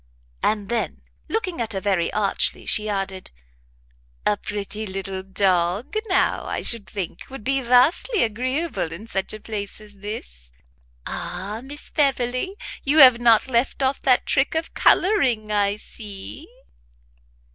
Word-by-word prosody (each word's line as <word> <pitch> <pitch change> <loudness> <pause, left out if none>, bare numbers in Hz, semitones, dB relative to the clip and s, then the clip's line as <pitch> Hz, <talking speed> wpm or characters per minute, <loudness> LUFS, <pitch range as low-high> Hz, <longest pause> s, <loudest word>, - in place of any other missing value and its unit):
And 210 -2 0
then, 235 +1 -2 0.3
looking 375 - -2
at 225 -1 -2
her 195 - -1
very 190 -4 0
archly, 205 -2 0
she 215 0 +1
added, 195 -2 -3 1.0
"A 210 - +3
pretty 210 +1 -3
little 190 0 -4
dog, 190 - +1
now, 370 - +1
I - - -3
should 215 -6 0
think, 185 -4 -5
would 270 -5 -8
be 270 +3 +1
vastly 260 - +3
agreeable 255 - -1
in 180 +7 -8
such 195 -4 -2
a 215 - -5
place 205 -2 -6
as 210 -1 -14
this. 130 - -8 0.6
Ah, 210 +4 -5
Miss 290 +3 -10
Beverley! 270 +4 0 0.3
you 290 +3 +2
have 255 -5 +9
not 230 -1 +5
left 260 +2 0
off 265 +1 +1
that 255 -2 +3
trick 270 +4 +1
of 320 0 -2
colouring, 255 - +3
I 205 -1 +2
see!" 210 - -9
215 Hz, 140 wpm, -23 LUFS, 200-265 Hz, 1.0 s, have